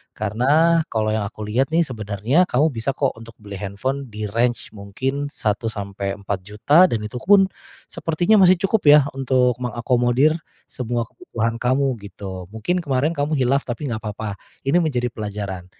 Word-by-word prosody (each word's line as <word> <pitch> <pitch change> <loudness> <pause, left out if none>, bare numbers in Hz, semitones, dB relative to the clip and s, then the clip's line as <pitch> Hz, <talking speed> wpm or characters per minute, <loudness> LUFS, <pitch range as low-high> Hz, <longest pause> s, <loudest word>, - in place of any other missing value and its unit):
Karena 145 +11 +2
kalau 110 -1 0
yang 110 - -1
aku 105 0 -6
lihat 130 +7 0
nih 165 - +3
sebenarnya 110 - +1
kamu 150 -2 +2
bisa 115 +4 -1
kok 135 0 -1
untuk 115 0 -11
beli 100 -2 -9
handphone 110 +7 -4
di 105 0 -4
range 120 +3 0
mungkin 135 +8 -3
Rp1.000.000-Rp4.000.000, 105 - 0
dan 115 - 0
itu 105 +3 -7
pun 195 -1 +6 0.4
sepertinya 170 +5 +1
masih 180 -1 +5
cukup 200 +3 +1
ya 150 - +9 0.2
untuk 125 -2 +2
mengakomodir 125 +5 +2 0.3
semua 120 -2 -3
kebutuhan 115 -1 -3
kamu, 130 +1 +1
gitu. 95 -2 -8
Mungkin 110 +12 -1
kemarin 145 +3 0
kamu 145 +2 0
khilaf, 135 0 +2
tapi 130 +3 -4
nggak 110 -1 -4
papa. 105 -1 -4 0.3
Ini 135 +5 +2
menjadi 125 -6 0
pelajaran. 100 -5 -5
120 Hz, 150 wpm, -21 LUFS, 105-140 Hz, 0.4 s, ya